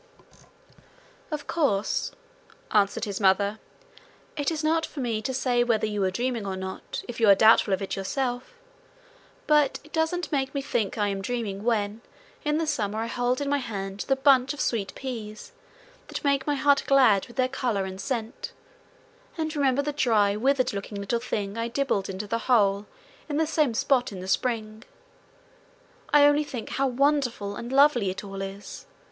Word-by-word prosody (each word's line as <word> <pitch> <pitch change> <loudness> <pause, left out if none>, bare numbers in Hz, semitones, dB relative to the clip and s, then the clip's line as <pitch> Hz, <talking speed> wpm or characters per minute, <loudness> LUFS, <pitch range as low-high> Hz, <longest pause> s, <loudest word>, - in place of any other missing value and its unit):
'Of 300 -2 -4
course,' 275 -12 0 0.6
answered 200 +2 +2
his 200 -2 -4
mother, 200 +2 +3 0.8
'it 290 -3 0
is 320 -2 -3
not 320 +1 +2
for 305 - -6
me 230 -4 -1
to 260 - -2
say 250 -2 +1
whether 230 -3 +1
you 210 -1 -2
were 190 - +2
dreaming 240 +3 -2
or 195 -1 -3
not 190 0 -6
if 240 -1 -6
you 225 -3 +5
are 200 - +9
doubtful 220 0 +5
of 190 +1 0
it 195 - -3
yourself; 245 - -3 0.9
but 300 -3 +3
it 300 - -19
doesn't 325 +1 -1
make 270 -1 -1
me 280 - 0
think 235 -6 -1
I 205 -1 +1
am 195 -1 -3
dreaming 205 -2 -3
when 220 -2 0 0.4
in 300 0 +1
the 325 - 0
summer 215 -9 -1
I 225 - -1
hold 245 +3 -1
in 285 - -2
my 285 0 +2
hand 195 -5 -5
the 270 - +3
bunch 270 0 +4
of - - -13
sweet 200 -9 -1
peas 235 - -7 0.6
that - - -6
make 280 -1 +1
my 290 - +2
heart 285 0 +3
glad 255 -8 +5
with 240 - -15
their 255 -1 +2
colour 245 -7 -1
and 190 0 -6
scent, 230 +2 -4 0.8
and 315 -1 -2
remember 280 -1 +2
the 295 0 -2
dry, 215 -7 +2
withered 255 +2 +1
looking 200 +1 -5
little 200 +4 -1
thing 210 -2 -3
I 230 - -1
dibbled 235 -6 -1
into 190 +2 -4
the 230 +3 -2
hole 200 -4 +3 0.4
in 290 - -1
the 320 - +2
same 300 -6 +1
spot 250 0 +2
in 190 - -7
the 185 - -7
spring. 220 0 -1 1.3
I 290 0 +7
only 290 +1 +4
think 255 -6 -6
how 275 0 0
wonderful 255 -6 0
and 235 +3 -6
lovely 270 -7 +4
it 185 - -5
all 195 -1 -7
is. 195 +1 -8
240 Hz, 180 wpm, -26 LUFS, 205-280 Hz, 1.3 s, are